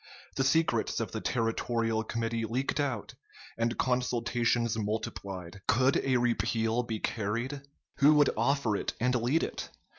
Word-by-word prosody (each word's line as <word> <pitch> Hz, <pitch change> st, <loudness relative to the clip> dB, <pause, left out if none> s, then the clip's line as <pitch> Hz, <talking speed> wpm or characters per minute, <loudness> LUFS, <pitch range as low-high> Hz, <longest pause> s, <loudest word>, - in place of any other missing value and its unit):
The 135 Hz, -, +1 dB
secrets 160 Hz, +4 st, +2 dB
of -, -, -3 dB
the -, -, -4 dB
Territorial 115 Hz, -1 st, 0 dB
Committee 115 Hz, 0 st, -2 dB
leaked 130 Hz, +6 st, -1 dB
out, 130 Hz, -7 st, -2 dB, 0.4 s
and 115 Hz, +1 st, -1 dB
consultations 120 Hz, -2 st, +1 dB
multiplied. 100 Hz, -4 st, -4 dB
Could 130 Hz, +3 st, +3 dB
a 130 Hz, -2 st, +2 dB
repeal 115 Hz, -1 st, +1 dB
be 115 Hz, -2 st, -3 dB
carried? 115 Hz, +7 st, -2 dB, 0.4 s
Who 150 Hz, +2 st, +6 dB
would 145 Hz, -2 st, +5 dB
offer 140 Hz, -6 st, +1 dB
it -, -, -2 dB
and 125 Hz, +2 st, +2 dB
lead 125 Hz, +6 st, +2 dB
it? -, -, -4 dB
120 Hz, 140 wpm, -30 LUFS, 110-130 Hz, 0.4 s, Who